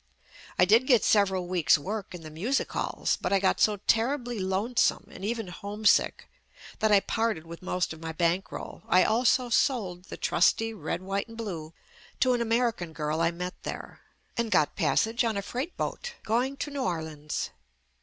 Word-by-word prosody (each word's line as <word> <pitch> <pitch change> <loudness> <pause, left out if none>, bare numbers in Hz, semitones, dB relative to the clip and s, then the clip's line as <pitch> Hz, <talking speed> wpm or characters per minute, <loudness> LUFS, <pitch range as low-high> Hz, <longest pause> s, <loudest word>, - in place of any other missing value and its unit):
I 180 - +6
did 225 +7 +4
get 245 -5 +5
several 190 -3 +3
weeks' 175 -6 +4
work 195 +5 -5
in 175 - -9
the 155 - -9
music 215 - -1
halls, - - -1
but 180 - -1
I 200 - +5
got 190 0 +1
so 210 -1 +3
terribly 245 0 +1
lonesome 195 +6 +1
and 185 - -10
even 225 -2 -2
homesick 205 +3 +1 0.5
that 220 0 +2
I 200 -1 +6
parted 220 -9 -1
with 170 0 -10
most 180 -2 -1
of 160 - -13
my 165 0 -4
bankroll 170 +3 -2
(I 185 +1 +5
also 245 +2 +2
sold 205 -8 +1
the - - -8
trusty 225 0 +2
red, 180 -1 -4
white 195 +2 -2
and 225 0 -12
blue 170 -8 -6 0.5
to 255 -1 +4
an 240 - 0
American 230 -7 0
girl 155 +1 -2
I 165 - +3
met 180 +1 -6
there) - - -7 0.4
and 235 -1 -1
got 155 -7 +2
passage 200 - +2
on 225 -3 0
a 200 - -2
freight 260 - -4
boat 485 -1 -4
going 250 +5 0
to 290 - -4
New 280 -1 -3
Orleans. 160 - -3
200 Hz, 180 wpm, -28 LUFS, 175-230 Hz, 0.5 s, I